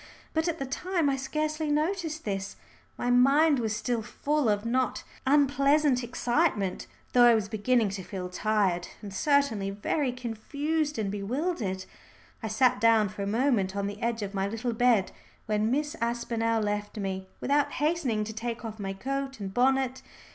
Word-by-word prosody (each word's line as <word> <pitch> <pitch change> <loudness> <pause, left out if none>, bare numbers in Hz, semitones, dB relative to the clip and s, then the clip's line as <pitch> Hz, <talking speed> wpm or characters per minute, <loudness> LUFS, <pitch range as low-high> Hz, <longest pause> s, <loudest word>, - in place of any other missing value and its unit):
But 320 +1 +1
at 335 -1 -1
the 275 - -3
time 330 +2 0
I - - +1
scarcely 305 +3 -2
noticed 315 +1 -1
this. 195 -1 -3 0.4
My 245 - 0
mind 275 +4 +5
was 220 -2 -1
still 235 +1 -1
full 290 +3 0
of 205 +1 0
not 255 +2 0 0.2
unpleasant 280 -1 +3
excitement, 240 - 0 0.3
though 245 -1 +7
I 240 -1 +7
was 215 -3 0
beginning 220 +1 +1
to 195 0 -5
feel 185 -1 -5
tired 185 -2 0 0.2
and 200 -2 -7
certainly 230 -4 +2
very 250 +7 -1
confused 285 +6 -2
and 205 -3 -1
bewildered. 205 - -2 0.6
I 220 - -3
sat 220 0 +2
down 225 -2 +5
for 205 0 -7
a 200 - -2
moment 215 -4 +1
on 200 0 -1
the 205 +1 -5
edge 230 -2 -1
of 200 0 -5
my 195 0 0
little 225 +3 -2
bed 230 -4 +3 0.3
when 215 0 +1
Miss 295 +4 0
Aspinall 230 -1 0
left 205 +1 -3
me, 190 -2 -3
without 285 +1 +1
hastening 295 -8 0
to 220 +1 -6
take 230 +1 -4
off 220 -1 -6
my 195 -1 -3
coat 270 +4 -4
and 195 -2 -5
bonnet. 260 +1 +2
235 Hz, 170 wpm, -28 LUFS, 210-280 Hz, 0.6 s, though